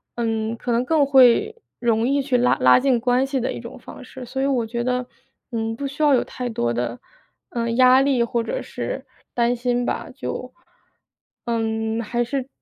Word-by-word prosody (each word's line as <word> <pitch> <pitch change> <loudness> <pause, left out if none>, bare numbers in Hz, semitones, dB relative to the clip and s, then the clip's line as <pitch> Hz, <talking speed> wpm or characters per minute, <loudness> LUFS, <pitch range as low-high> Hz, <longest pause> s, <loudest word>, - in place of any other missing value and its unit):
嗯， 225 -1 -2
可 245 - -3
能 235 +1 +2
更 300 +1 +3
会 270 - +5 0.2
容 230 -1 +1
易 280 +1 +2
去 265 -2 +1
拉 245 +1 +3
拉 125 0 +6
近 260 -2 +2
关 250 +2 +2
系 270 0 -2
的 245 - -2
一 - - -6
种 235 +2 -10
方 240 - -11
式。 255 0 -10
所 260 +2 -4
以 - - +1
我 260 -4 +1
觉 235 +1 -3
得， 250 0 -1 0.5
嗯， 225 0 -2
不 280 +4 -4
需 285 +3 -4
要 295 -2 +5
有 255 - +3
太 250 -1 -5
多 120 - -1
的， 120 0 -3 0.5
呃， 235 -1 -2
压 255 +2 +6
力 270 -3 +2
或 235 0 -1
者 - - -3
是 - - -5 0.3
担 240 0 +1
心 245 0 -1
吧， 320 - -3
就， 255 -1 -6 0.9
嗯， 225 -1 -1
还 235 +2 -2
是 260 +2 -3
245 Hz, 210 characters per minute, -22 LUFS, 230-265 Hz, 0.9 s, 拉